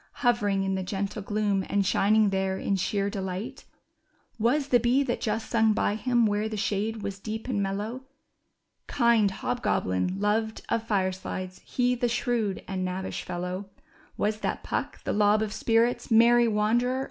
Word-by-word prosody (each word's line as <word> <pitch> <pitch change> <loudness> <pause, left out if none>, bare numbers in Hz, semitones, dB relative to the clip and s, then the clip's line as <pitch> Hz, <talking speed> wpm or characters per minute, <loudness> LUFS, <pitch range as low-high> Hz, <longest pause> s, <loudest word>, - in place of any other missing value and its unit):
Hovering 205 -5 +2
in 195 0 -1
the 190 - -1
gentle 200 +3 -3
gloom, 205 -1 0
and 200 -1 +1
shining 210 +2 +3
there 190 0 0
in 195 - 0
sheer 200 +1 0
delight? 190 +1 -5 0.7
Was 270 +6 +1
the 245 - +5
bee 245 +4 +3
that 250 -3 -2
just 220 0 -2
sung 225 -2 +3
by 205 - +1
him, 240 +2 +2
where 210 +1 0
the 215 - -4
shade 210 +2 -1
was 200 -1 -4
deep 220 +3 -5
and 220 -6 0
mellow, 210 +6 -3 0.8
Kind 235 -5 +3
Hobgoblin, 190 - -1
loved 220 +2 0
of 230 -1 -1
firesides, 185 -2 -2
he 250 0 0
the 245 0 0
shrewd 235 -4 -1
and 190 -1 -3
knavish 185 +1 -3
fellow 180 +2 -5 0.2
— - - -29
Was 210 +1 0
that - - -3
Puck, - - -4
the - - -1
lob 210 +1 +3
of 210 -1 -4
spirits, 235 +1 +1
merry 235 +1 +6
wanderer 210 -1 +1
of 240 - +4
the 245 +1 0
night - - -1
210 Hz, 175 wpm, -27 LUFS, 195-235 Hz, 0.8 s, merry